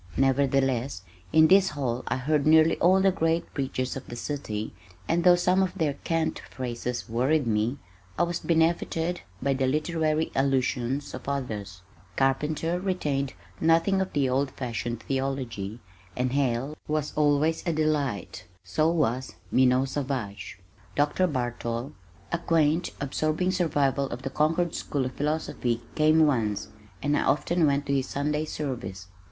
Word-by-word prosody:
Nevertheless 135 -4 +1 0.3
in 160 0 +6
this 190 +2 +5
hall 130 -5 -2
I - - 0
heard 150 +3 +1
nearly 160 +1 +6
all 185 +2 +5
the 195 0 +4
great 165 -2 0
preachers 130 -2 -2
of 135 - -7
the 120 - -7
city, 120 -5 -4 0.3
and 170 +1 +1
though 180 0 +7
some 180 +2 +2
of 190 -2 -1
their 150 -3 +1
cant 165 +3 -1
phrases 125 -1 -4
worried 130 +6 +1
me, 110 +4 0 0.4
I - - +3
was 175 0 -1
benefited 165 +1 +1 0.2
by 140 0 +2
the 130 -1 0
literary 155 +2 0
allusions 135 0 0
of - - -6
others. 105 -9 -4 0.3
Carpenter 150 +5 0
retained 150 -8 -1 0.3
nothing 165 +4 +3
of 190 - -2
the 140 -3 +2
old 135 +2 +1
fashioned 120 -3 -4
theology, 130 -6 -3 0.4
and 125 0 0
Hale 135 +1 0
was 150 -1 -1
always 150 +2 +2
a - - +3
delight 145 - -1 0.2
so 125 - +1
was 130 -6 0 0.2
Minot 130 +1 +3
Savage. 125 -11 -4 0.4
Dr. 150 +6 +2
Bartol, 120 -2 -3 0.4
a 170 - 0
quaint 165 0 +2
absorbing 155 +5 0
survival 145 -6 +1
of 125 +2 -6
the 135 - -3
Concord 165 +4 +1
School 140 -3 -2
of 130 - -4
Philosophy, 145 -5 -1
came 155 +1 +5
once, 110 -8 0 0.3
and 145 +1 +2
I - - +2
often 150 +4 +2
went 140 0 +1
to 140 - -1
his 135 -1 0
Sunday 150 +2 -1
service. 120 -12 -5
140 Hz, 145 wpm, -27 LUFS, 125-160 Hz, 0.4 s, though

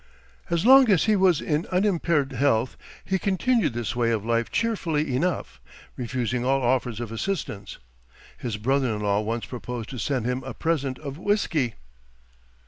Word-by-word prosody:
As 170 +2 0
long 265 -1 +8
as 190 -5 +4
he 215 - +3
was 185 -5 +3
in 150 +2 -1
unimpaired 170 -7 +1
health 130 -3 +1 0.3
he 190 0 0
continued 200 - +1
this 120 -1 -3
way 120 -1 +1
of 110 -2 -1
life 115 0 0
cheerfully 160 - 0
enough, 170 +5 -2 0.3
refusing 125 -1 -2
all 135 +1 +1
offers 120 -2 0
of 120 -2 -5
assistance. 115 - -4 0.6
His 115 -4 -4
brother 130 +1 +1
in 105 - -5
law 100 0 +1
once 115 +2 -3
proposed 125 -2 -6
to 130 - -6
send 130 0 -1
him 125 +1 -1
a 130 -2 -7
present 140 -6 -1
of 140 0 -7
whiskey. 170 - 0
135 Hz, 160 wpm, -25 LUFS, 120-170 Hz, 0.6 s, long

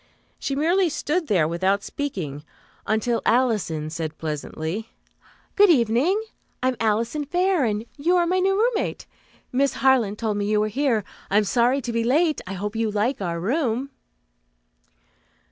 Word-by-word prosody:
She 275 - -2
merely 345 +5 +2
stood 315 +2 -1
there 175 - +3
without 190 +4 0
speaking, 170 - -4 0.4
until 220 +2 +1
Alison 210 -11 +1
said 160 -1 -4
pleasantly, 160 +7 -4 0.7
"Good 410 -1 +6
evening. 265 - +3 0.4
I 255 - +4
am 255 - -2
Alison 230 +7 0
Fair, 355 0 +1
and 215 0 -1
you 335 +6 +2
are 350 - +3
my 365 +2 +1
new 390 +1 +2
roommate. 455 0 0 0.5
Miss 275 +2 +2
Harland 245 -6 +2
told 215 -2 -1
me 205 - -1
you 210 0 +2
were 215 0 +1
here. 240 -2 +1 0.3
I'm 210 +2 +3
sorry 240 +6 +2
to 235 -1 -4
be 230 0 +1
late. 305 +6 +2
I 190 - -4
hope 205 +3 -4
you 225 -1 0
like 215 +4 -1
our 170 -2 -2
room." 255 - -1
230 Hz, 155 wpm, -23 LUFS, 205-290 Hz, 0.7 s, Good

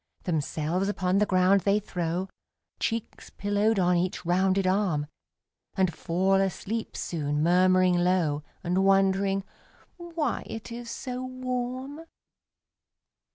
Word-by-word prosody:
Themselves 165 +3 -1
upon 190 -1 +1
the 210 - +2
ground 185 +1 +4
they 200 +2 +2
throw, 180 -2 -3 0.5
Cheeks 230 -1 -3
pillowed 205 +2 0
on 180 -1 +3
each 180 0 -2
rounded 185 +2 +2
arm 185 -6 +1 0.7
And 185 -3 +2
fall 190 +4 +1
asleep 200 +4 -3
soon, 150 -2 -2
murmuring 185 +1 +4
low, 175 -5 +1 0.2
And 180 +2 +1
wondering 195 0 +3 0.5
"why 335 -6 -2
it 225 +1 -7
is 235 0 -7
so 250 +2 -5
warm?" 255 +3 -4
190 Hz, 110 wpm, -27 LUFS, 180-220 Hz, 0.7 s, ground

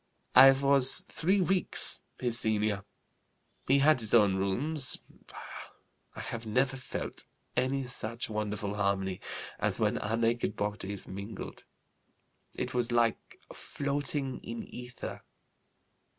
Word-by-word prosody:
I 135 +1 +10
was 135 -1 +4
three 190 +5 +2
weeks 185 +1 +2 0.2
his 120 -2 +3
senior. 105 -2 0 0.8
He 135 - +5
had 145 0 +5
his 110 0 +1
own 105 -4 +5
rooms. 125 +10 -1 1.2
I - - -6
have 115 0 -5
never 125 +5 +1
felt 130 -1 -6 0.3
any 130 +2 +1
such 120 -2 -4
wonderful 105 -1 -3
harmony 100 -2 -1 0.4
as - - 0
when - - +1
our 110 +2 -1
naked 115 +1 +1
bodies 105 -1 -4
mingled. 100 +2 -7 0.9
It 125 0 -3
was 120 -1 0
like 120 -1 +1 0.2
floating 140 -1 -3
in 115 0 -6
ether. 125 0 -7
120 Hz, 115 wpm, -30 LUFS, 105-135 Hz, 1.2 s, I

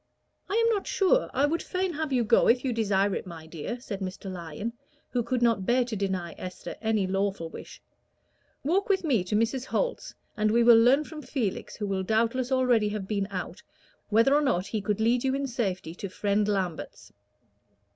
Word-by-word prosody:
"I 400 - -1
am 460 0 +4
not 400 -2 -2
sure, 415 +6 +2
I 275 +3 +2
would 325 +3 0
fain 370 -1 -2
have 310 -1 -3
you 250 -2 +2
go 230 +1 +4
if 250 +3 +3
you 255 - 0
desire 200 -3 +1
it, - - -4
my 165 -3 -9
dear," 165 +9 -6
said 210 -5 -6
Mr. 190 0 -5
Lyon, 175 +6 -5 0.4
who 245 - +1
could 240 +1 -1
not 225 -5 +2
bear 245 +1 +3
to 240 -2 -4
deny 190 -4 -2
Esther 185 0 -7
any 220 -3 +1
lawful 195 -3 -1
wish. - - -10 0.8
"Walk 370 +9 +1
with 385 -2 +2
me 255 - +2
to 185 +3 -2
Mrs. 235 +4 0
Holt's, - - -2 0.2
and 215 -1 +1
we 235 +2 +4
will 235 0 +8
learn 255 +6 +5
from 305 0 -9
Felix, 235 -10 -3
who 210 - -4
will 195 -1 -1
doubtless 230 +5 0
already 250 -5 +3
have 205 -2 -4
been 200 -2 -1
out, 185 -3 -5 0.5
whether 230 +5 +4
or 295 - +4
not 235 -11 +1
he 215 +1 -3
could 210 0 -1
lead 235 +2 +2
you 265 0 +1
in 280 0 -1
safety 195 -10 -3
to 195 +2 -6
Friend 205 +2 0
Lambert's." 190 -5 -3
225 Hz, 200 wpm, -27 LUFS, 195-260 Hz, 0.8 s, will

